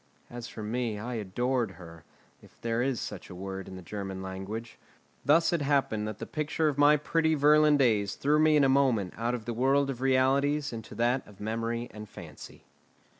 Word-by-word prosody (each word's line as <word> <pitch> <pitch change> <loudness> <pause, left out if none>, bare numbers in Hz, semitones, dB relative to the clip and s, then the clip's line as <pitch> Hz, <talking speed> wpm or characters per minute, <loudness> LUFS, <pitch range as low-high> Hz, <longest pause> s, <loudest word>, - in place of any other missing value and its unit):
As 120 -1 -7
for 110 - -8
me, 115 0 -2
I 120 +4 -5
adored 115 +1 -1
her, 85 -2 -12 0.4
if - - -20
there 115 0 0
is 130 -2 0
such - - -7
a 90 - -9
word 95 +1 -6
in 95 - -8
the 95 - -9
German 95 0 -5
language. 95 +5 -6 0.4
Thus 165 +4 +4
it 170 - +1
happened 135 -7 +1
that 110 -1 -5
the - - -6
picture 155 +1 -1
of 150 - 0
my 145 +1 +5
pretty 160 +2 +1
Virlandaise 145 -8 +4
threw 150 +2 +2
me 155 0 +5
in 145 - +5
a - - +5
moment 130 -9 +2
out 120 +2 -1
of 115 -3 -7
the 120 - -3
world 135 +3 +2
of 125 -2 -8
realities 135 +2 +2
into 110 -1 -8
that 120 +3 0
of 100 -2 -16
memory 115 +2 -2
and 105 -1 -9
fancy. - - -11
120 Hz, 195 wpm, -29 LUFS, 105-140 Hz, 0.4 s, my